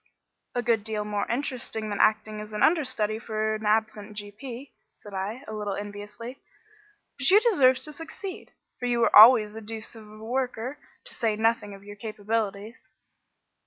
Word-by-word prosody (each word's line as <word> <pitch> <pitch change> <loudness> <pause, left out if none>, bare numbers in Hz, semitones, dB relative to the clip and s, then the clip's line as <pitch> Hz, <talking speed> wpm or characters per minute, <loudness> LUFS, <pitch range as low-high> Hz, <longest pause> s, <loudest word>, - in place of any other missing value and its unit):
"A 245 - 0
good 225 -2 +2
deal 215 -1 -2
more 205 -1 -2
interesting 240 -4 -3
than 205 - -3
acting 215 0 +2
as 210 0 -8
understudy 220 -6 +1
for 220 -1 -1
an 215 0 -3
absent 215 -1 0
g.p.," 235 +6 -8 0.2
said 205 - -13
I, 205 +7 -4
a 215 - -6
little 210 -2 -3
enviously. 205 +5 -8 0.8
"But 275 - +3
you 400 +3 +8
deserve 285 - +4
to 305 - -6
succeed, 345 +5 -8 0.3
for 245 - -2
you 240 -1 +1
were - - +3
always 215 -1 +9
a 225 - -7
deuce 220 0 -6
of 215 -2 -13
a 215 - -13
worker, 255 +2 -2 0.2
to - - -9
say 225 -2 0
nothing 220 -2 0
of 195 - -15
your 205 0 -10
capabilities." 215 0 -4
220 Hz, 165 wpm, -27 LUFS, 210-245 Hz, 0.8 s, always